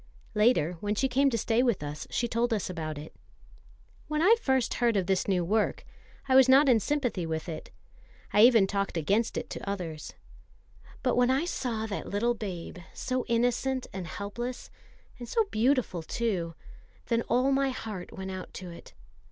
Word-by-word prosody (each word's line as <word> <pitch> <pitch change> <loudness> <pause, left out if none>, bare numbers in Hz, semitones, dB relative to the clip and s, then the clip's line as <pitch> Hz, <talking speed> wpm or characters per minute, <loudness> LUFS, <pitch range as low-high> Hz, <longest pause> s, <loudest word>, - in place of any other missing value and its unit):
Later, 210 -7 +3
when 205 +2 -1
she 265 +5 +1
came 275 +2 +3
to 235 - -1
stay 225 +2 +2
with 240 - +1
us, 145 +1 -6
she 240 - 0
told 235 +1 0
us 200 -3 -3
about 155 -3 -4
it. 150 +2 -9 0.9
"When 305 +1 0
first 265 - +1
I - - -5
heard 235 -3 +3
of 190 - +1
this 190 0 0
new 180 -3 +1
work, 215 +4 0 0.4
I 260 - +2
was 260 0 +7
not 275 +2 +7
in 240 -4 +5
sympathy 245 -5 -1
with 160 +1 -3
it. 160 -2 -6 0.6
I 210 - +5
even 230 -3 +7
talked 200 -2 -2
against 200 +9 +1
it - - -3
to - - -5
others. 170 -6 -5 0.9
But 250 -2 +1
when 245 0 +4
I 270 +5 +2
saw 235 -10 -2
that 205 -2 -5
little 230 +4 +1
babe, 185 -6 -6 0.2
so 255 -1 -2
innocent 245 +2 +1
and 185 -2 -5
helpless, 220 +8 -5 0.5
and 240 - -8
so 455 - +2
beautiful 235 -6 +1
too, 175 -3 -2 0.5
then 230 -1 +1
all 255 +4 +3
my 275 0 +2
heart 215 -7 -6
went 190 0 -6
out 185 -1 -7
to 180 -1 -7
it. 170 - -13
225 Hz, 180 wpm, -29 LUFS, 185-250 Hz, 0.9 s, was